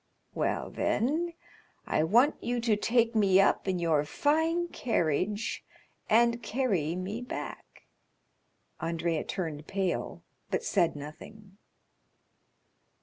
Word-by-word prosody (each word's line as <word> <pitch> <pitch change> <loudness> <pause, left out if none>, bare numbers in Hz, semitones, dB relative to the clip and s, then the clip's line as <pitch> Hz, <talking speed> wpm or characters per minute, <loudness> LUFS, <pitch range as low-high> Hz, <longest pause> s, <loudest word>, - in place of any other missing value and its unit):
"Well, - - -1
then, 320 +8 0 0.5
I - - +1
want 240 - +3
you 240 +1 -1
to 230 -2 +2
take 230 +2 +2
me 195 -4 +4
up 195 - +3
in 185 -1 +1
your 165 -4 +2
fine 320 - +1
carriage, 205 - -1 0.5
and 235 +1 +4
carry 200 - 0
me 195 +6 -4
back." 245 - -7 1.0
Andrea 165 -1 -1
turned 155 -5 -4
pale, 190 -2 -2 0.3
but - - -1
said 175 -6 +2
nothing. 190 +8 -11
205 Hz, 105 wpm, -29 LUFS, 170-240 Hz, 1.0 s, me